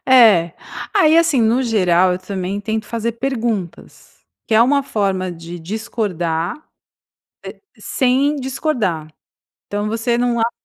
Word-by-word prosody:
É. 215 Hz, -10 st, +6 dB, 0.4 s
Aí, 315 Hz, +1 st, +5 dB
assim, 325 Hz, -7 st, +3 dB
no 230 Hz, +4 st, +2 dB
geral, 185 Hz, -6 st, +3 dB
eu 180 Hz, -, -4 dB
também 190 Hz, +1 st, -4 dB
tento 220 Hz, +1 st, -3 dB
fazer 230 Hz, 0 st, -2 dB
perguntas, 230 Hz, -7 st, -5 dB, 0.2 s
que 220 Hz, -, 0 dB
é 225 Hz, -, +7 dB
uma 280 Hz, +3 st, +3 dB
forma 195 Hz, -6 st, -1 dB
de 170 Hz, +1 st, -9 dB
discordar 175 Hz, -, -3 dB, 1.2 s
e -, -, -19 dB
sem 270 Hz, +3 st, +1 dB
discordar. 250 Hz, -, -2 dB, 0.6 s
Então 205 Hz, +1 st, -2 dB
você 230 Hz, +2 st, -1 dB
não 240 Hz, -1 st, 0 dB
acha 230 Hz, +1 st, +1 dB
220 Hz, 130 wpm, -19 LUFS, 185-245 Hz, 1.2 s, é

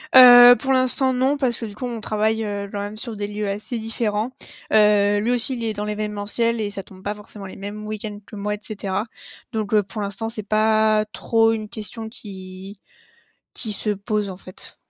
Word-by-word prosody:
Heu, 245 Hz, -1 st, +10 dB
pour 270 Hz, -, -2 dB
l'instant 260 Hz, +1 st, +3 dB
non, 260 Hz, +3 st, +1 dB
parce 255 Hz, -4 st, 0 dB
que 230 Hz, -, -4 dB
du 205 Hz, -2 st, -9 dB
coup 250 Hz, -, -5 dB
on 240 Hz, -2 st, -4 dB
travaille, 220 Hz, +1 st, 0 dB
heu, 200 Hz, -1 st, -4 dB
quand 205 Hz, -, -4 dB
même 205 Hz, +1 st, -5 dB
sur 225 Hz, 0 st, -6 dB
des 205 Hz, 0 st, -4 dB
lieux 210 Hz, 0 st, -3 dB
assez 210 Hz, +5 st, -4 dB
différents. 225 Hz, 0 st, -2 dB, 0.4 s
Heu, 205 Hz, -1 st, +4 dB
lui 225 Hz, +4 st, 0 dB
aussi 245 Hz, +2 st, +4 dB
il 235 Hz, -, -4 dB
est 220 Hz, -1 st, -1 dB
dans 210 Hz, 0 st, -4 dB
l'évènementiel 210 Hz, +2 st, -1 dB
et 210 Hz, -, -1 dB
ça 200 Hz, -1 st, -6 dB
tombe 190 Hz, -1 st, -16 dB
pas 205 Hz, -, -2 dB
forcément 210 Hz, -1 st, -11 dB
les 190 Hz, -, -9 dB
mêmes 205 Hz, +2 st, -7 dB
week-ends 210 Hz, -1 st, -5 dB
que 215 Hz, -, -12 dB
moi 205 Hz, +1 st, -2 dB
et -, -, -13 dB
cetera. 205 Hz, -1 st, -3 dB, 0.5 s
Donc, 220 Hz, -3 st, -3 dB
heu, 210 Hz, -1 st, +4 dB
pour 205 Hz, +2 st, -7 dB
l'instant, 205 Hz, +2 st, -3 dB
c'est 225 Hz, -2 st, -4 dB
pas 215 Hz, 0 st, +3 dB
trop 225 Hz, -1 st, +2 dB
une 215 Hz, -1 st, -3 dB
question 220 Hz, +1 st, -4 dB
qui 190 Hz, -2 st, -9 dB, 0.7 s
qui 220 Hz, -4 st, 0 dB
se 210 Hz, +2 st, -3 dB
pose 210 Hz, 0 st, -1 dB
en 185 Hz, -, -7 dB
fait. 185 Hz, -1 st, -10 dB
215 Hz, 210 wpm, -22 LUFS, 205-225 Hz, 0.7 s, Heu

